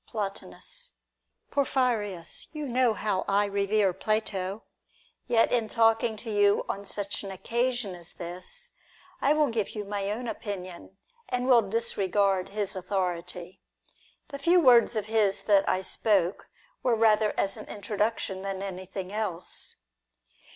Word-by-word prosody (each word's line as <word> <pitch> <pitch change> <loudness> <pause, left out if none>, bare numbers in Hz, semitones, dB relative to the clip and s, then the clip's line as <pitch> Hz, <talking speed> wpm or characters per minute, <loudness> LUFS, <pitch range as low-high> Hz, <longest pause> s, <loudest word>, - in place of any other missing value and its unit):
Plotinus. 485 - -4 0.6
Porphyrins, 230 -11 0
you 305 -1 -4
know 250 -2 +2
how 205 -3 -1
I 205 +1 +3
revere 200 -1 +1
Plato; 200 0 -2 0.6
yet 230 -2 +4
in 230 -3 +1
talking 225 0 +3
to 220 +1 -6
you 205 -1 +3
on 200 +1 -4
such 200 0 -3
an 195 - -6
occasion 235 +2 -1
as 175 -1 -9
this, 175 +1 -7 0.5
I 285 - +4
will 300 -2 +3
give 225 -2 -2
you 210 -1 -4
my 200 0 -2
own 235 +4 -3
opinion, 195 -4 -6 0.3
and 250 0 -1
will 245 -3 +7
disregard 195 -3 +1
his 205 -1 -2
authority. 180 -1 -3 0.7
The 280 - -6
few 345 +5 +5
words 245 -6 +6
of 215 -2 -1
his 215 -3 +2
.that 200 -2 +4
I 185 - +1
spoke 190 -2 +1 0.3
were 245 -3 +2
rather 220 -1 +3
as 195 - +2
an - - -8
introduction 205 -1 -2
than 195 0 -4
anything 190 0 -6
else. 195 -5 -2
205 Hz, 135 wpm, -28 LUFS, 195-230 Hz, 0.7 s, will